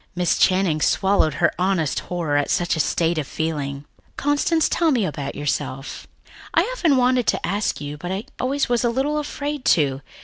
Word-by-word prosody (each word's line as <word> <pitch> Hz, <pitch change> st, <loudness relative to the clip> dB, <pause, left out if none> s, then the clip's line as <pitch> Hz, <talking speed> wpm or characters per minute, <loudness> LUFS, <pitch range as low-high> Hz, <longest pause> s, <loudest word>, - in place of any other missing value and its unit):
Miss 180 Hz, -1 st, +1 dB
Channing 185 Hz, -5 st, +3 dB
swallowed 190 Hz, -6 st, +2 dB
her 170 Hz, -, +2 dB
honest 180 Hz, -5 st, +1 dB
horror 170 Hz, -5 st, -3 dB
at 145 Hz, 0 st, +1 dB
such 175 Hz, -1 st, +1 dB
a -, -, -4 dB
state 165 Hz, +1 st, +1 dB
of 145 Hz, -, -4 dB
feeling. 145 Hz, -3 st, -3 dB, 0.3 s
"Constance, 290 Hz, +3 st, +2 dB
tell 335 Hz, -2 st, +1 dB
me 245 Hz, -9 st, +2 dB
about 145 Hz, -4 st, -4 dB
yourself. 135 Hz, -1 st, -4 dB, 0.5 s
I've -, -, +4 dB
often 325 Hz, -, +2 dB
wanted 250 Hz, -1 st, +2 dB
to -, -, +1 dB
ask 200 Hz, +4 st, -1 dB
you, 145 Hz, 0 st, -6 dB
but 175 Hz, +3 st, -5 dB
I 195 Hz, +3 st, -3 dB, 0.2 s
was 275 Hz, +2 st, +1 dB
always 240 Hz, 0 st, +1 dB
a 240 Hz, -, +2 dB
little 275 Hz, +5 st, 0 dB
afraid 290 Hz, -1 st, -4 dB
to. 135 Hz, -3 st, 0 dB
180 Hz, 180 wpm, -22 LUFS, 150-255 Hz, 0.5 s, I've